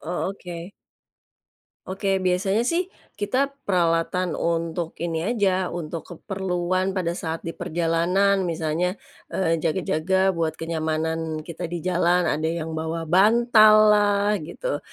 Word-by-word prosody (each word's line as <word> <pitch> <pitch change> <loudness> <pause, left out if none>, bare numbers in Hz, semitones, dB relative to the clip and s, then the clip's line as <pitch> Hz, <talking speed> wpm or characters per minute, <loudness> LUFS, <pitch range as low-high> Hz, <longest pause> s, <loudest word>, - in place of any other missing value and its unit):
Oh, 175 +2 -3
oke. 175 -1 -8 1.2
Oke 195 0 -1
biasanya 190 +4 +1
sih 340 +8 0 0.3
kita 255 +7 0 0.2
peralatan 175 -1 +1
untuk 165 0 -2
ini 165 +1 -2
aja 190 -4 +1
untuk 165 -1 -5
keperluan 185 0 -2
pada 180 -3 -1
saat 165 -1 -4
di 165 - -4
perjalanan 175 +3 +1
misalnya, 165 +2 -1 0.4
eee, 165 -3 +1
jaga-jaga 185 +3 +1
buat 165 -3 -1
kenyamanan 160 -1 -2
kita 170 +2 -6
di 170 0 -5
jalan 180 0 +2
ada 155 +2 -1
yang 165 -1 -3
bawa 160 +1 -3
bantallah 210 +1 +5 0.2
gitu, - - -3
175 Hz, 115 wpm, -24 LUFS, 165-195 Hz, 1.2 s, bantallah